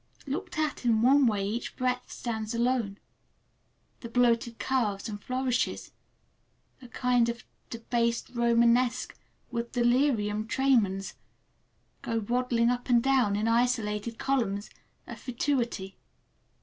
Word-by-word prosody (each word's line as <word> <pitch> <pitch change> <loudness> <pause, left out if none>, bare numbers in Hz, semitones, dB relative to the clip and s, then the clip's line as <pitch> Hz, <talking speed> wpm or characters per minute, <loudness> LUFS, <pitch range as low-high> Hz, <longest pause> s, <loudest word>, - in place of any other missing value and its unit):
Looked 335 +6 -4
at 305 -4 -1
in 230 -2 +2
one 270 +1 +5
way 205 -3 0
each 230 +4 -4
breadth 250 0 -2
stands 220 -1 -4
alone, 235 -4 0 1.0
the 235 - -8
bloated 235 -1 +2
curves 225 -6 -1
and 205 -2 -6
flourishes—a 255 0 -5
kind 245 -1 +1
of 235 -1 -5 0.3
"debased 235 0 -1
Romanesque" 235 +1 +2 0.4
with 235 0 -4
delirium 240 -4 +1
tremens—go 230 -1 -2
waddling 240 -1 +2
up 245 +1 -4
and 240 -1 +4
down 260 -7 +3
in 210 +2 0
isolated 230 -2 0
columns 225 -7 -1 0.3
of - - -9
fatuity. 240 -6 -2
235 Hz, 110 wpm, -28 LUFS, 225-250 Hz, 1.0 s, one